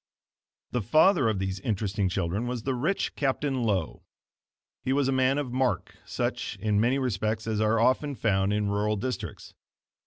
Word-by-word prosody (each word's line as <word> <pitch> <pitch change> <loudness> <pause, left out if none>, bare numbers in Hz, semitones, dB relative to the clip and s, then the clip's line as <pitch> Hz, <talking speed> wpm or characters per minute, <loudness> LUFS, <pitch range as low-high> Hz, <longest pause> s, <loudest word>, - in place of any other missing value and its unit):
The 125 - 0
father 155 - +4
of 110 - 0
these 95 0 -2
interesting 100 -1 -1
children 95 +5 -1
was 120 -2 -3
the 135 - 0
rich 155 +11 -1
Captain 135 -1 0
Lowe. 100 -8 -1 0.8
He 130 - +1
was 140 -1 +2
a - - +2
man 130 +1 +2
of 135 -4 -3
mark, 130 -1 0
such, - - -3
in 105 0 +1
many 125 +4 +2
respects 110 -3 -1
as 110 -1 -1
are 110 +1 +2
often 135 +4 +2
found 95 -4 +1
in 105 0 0
rural 105 +1 0
districts. 125 +5 -5
115 Hz, 165 wpm, -27 LUFS, 105-130 Hz, 0.8 s, father